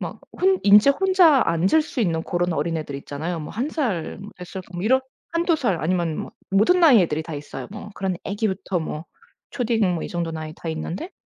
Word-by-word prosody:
막 - - -6 0.2
혼 380 0 +3
인제 205 +6 +7
혼자 350 -4 +5
앉을 180 - +3
수 290 - -5
있는 165 -6 +1
그런 175 0 -1
어린 165 +2 -1
애들 150 -3 -5
있잖아요. 155 +5 -5
뭐 150 - -7
1 240 +6 -2
살 225 - -2 0.2
몇 180 - -8
살 190 0 -7
뭐 175 +1 -5
이런 260 +5 +4 0.3
1-2 335 -1 +2
살 195 - -1
아니면 170 -2 0
막 - - -13 0.2
모든 215 - +4
나이의 260 - +7
애들이 160 -1 -2
다 160 -1 -7
있어요. 145 0 -7
뭐 210 0 -8
그런 190 -2 -2
애기부터 195 -2 -2
뭐 155 0 -5 0.4
초딩 225 -7 +1
뭐 165 - -3
이 - - -5
정도 170 -1 -3
나이 155 -1 -6
다 165 - -7
있는데 165 - -4
185 Hz, 345 characters per minute, -23 LUFS, 165-245 Hz, 0.4 s, 인제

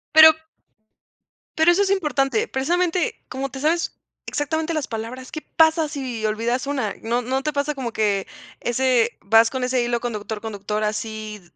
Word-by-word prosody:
Pero 315 0 +11 1.3
pero 320 +2 +6
eso 370 - +3
es 390 - 0
importante. 360 - +1
Precisamente, 350 - 0
como 270 +1 -3
te 265 - -8
sabes 330 +3 0 0.3
exactamente 315 +3 -1
las 310 -3 -2
palabras, 235 +3 -6
¿qué 310 - -5
pasa 320 0 +3
si 255 -7 -4
olvidas 230 +5 -1
una? 265 -8 -1
¿No 235 +2 0
no 265 +3 -2
te 305 - -1
pasa 285 +1 0
como 245 -4 -4
que? 205 -3 0 0.3
Ese 240 -1 +1
vas 225 +3 +5
con 260 -1 -3
ese 250 0 +1
hilo 240 0 0
conductor, 215 -2 -4
conductor, 210 -1 -3
así 215 0 -4
260 Hz, 160 wpm, -22 LUFS, 225-310 Hz, 1.3 s, Pero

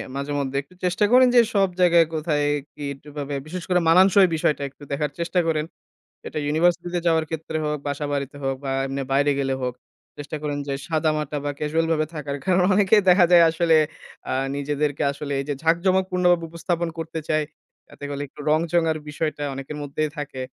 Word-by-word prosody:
মাঝে-মধ্যে 140 -1 -2
একটু 165 +6 -22
চেষ্টা 180 +3 +2
করেন 255 +1 +7
যে 240 - +8 0.2
সব 195 -1 +3
জায়গায় 170 -2 +5
কোথায় 150 -2 0 0.3
কি, 145 - -6 0.2
কিভাবে, 145 -1 -6
বিশেষ 180 +2 -6
করে 180 -1 +3
মানানসই 190 +2 +6
বিষয়টা 155 -2 0
একটু 140 - -18
দেখার 145 +1 -1
চেষ্টা 175 +2 0
করেন। 155 -1 0 0.6
এটা - - -4
ইউনিভার্সিটিতে 175 +3 +1
যাওয়ার 160 -1 +3
ক্ষেত্রে 160 0 -4
হোক, 150 0 -1
বাসা 145 +1 -3
বাড়িতে 140 0 -3
হোক 135 0 0
বা, 135 - -2 0.2
এমনি 135 0 -3
বাইরে 145 +1 +3
গেলে 135 -1 0
হোক। 125 -1 -2 0.4
চেষ্টা 145 +1 -6
করেন 145 -1 -2
যে 140 - -1
সাদামাটা 155 -2 -1
বা, 145 - -1
ক্যাজুয়াল 160 +2 0
ভাবে 155 -1 +1
থাকার। 145 -2 -4
কারণ 185 -1 +3
অনেকেই 205 +1 +4
দেখা 180 0 +6
যায় 170 -1 +8
আসলে 165 0 +3 0.5
আ - - 0 0.2
নিজেদেরকে 145 0 -1
আসলে 140 0 -6
এই - - -4
যে 145 - 0
ঝাঁকজমক 185 +3 +2
পূর্ণভাবে 180 -2 +2
উপস্থাপন 170 0 -2
করতে 160 0 -4
চায়। 155 0 +1 0.4
যাতে 145 - -11
হলে 140 0 -4
একটু 145 - -15
রং-চং 165 +2 +2
এর 155 - -5
বিষয়টা 150 0 -3
অনেকের 135 +2 -7
মধ্যেই 150 +2 -2
থাকে। 135 -3 -5
155 Hz, 185 wpm, -23 LUFS, 145-170 Hz, 0.6 s, যে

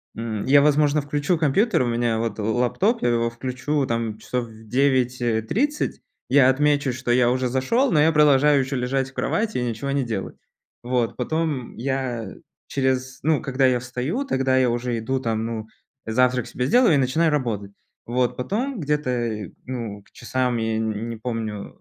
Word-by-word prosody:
м, 110 -2 -4
я, 140 +1 +6
возможно, 150 0 +3
включу 145 +4 0
компьютер, 165 - +2
у 120 - -1
меня 115 -1 0
вот 115 -1 -3
л 110 +2 -1
лаптоп, 195 - +1
я 120 - +3
его 115 0 +1
включу 130 +4 -2
там 115 -3 -2
часов 125 +2 -3
в 110 0 -15
9:30. 125 - 0 0.3
Я 130 0 +6
отмечу, 145 -1 +2
что 125 -1 -2
я 120 0 +4
уже 130 0 0
зашел, 180 - +1
но 155 - +3
я 160 +2 +5
продолжаю 150 -2 +5
ещё 135 +1 -3
лежать 135 +2 -1
в - - -28
кровати 215 - -1
и 125 - 0
ничего 120 +3 -3
не 140 -1 +1
делать. 110 -5 -4 0.5
Вот 120 -1 0
потом 150 -1 -2
я 125 -4 -3 0.3
через 130 -1 -1
ну, 155 0 +2
когда 135 -2 +1
я 125 -1 +2
встаю, 125 - -3
тогда 130 - +1
я 130 -1 +3
уже 120 0 -1
иду, 130 +4 -1
там, 115 -3 -2
ну, 110 -1 -4 0.4
завтрак 125 +2 +1
себе 125 - -3
сделаю 240 - +4
и - - +4
начинаю 145 +5 +2
работать. 110 -8 -2 0.4
Вот, 125 +1 0
потом 230 - -2
где-то, 125 - -2
ну, 115 -5 -5
к - - -28
часам, 125 0 -1
я 110 -1 -1
н 110 +1 -2
не 115 - -5
помню, 110 -3 -5
125 Hz, 175 wpm, -23 LUFS, 115-145 Hz, 0.5 s, я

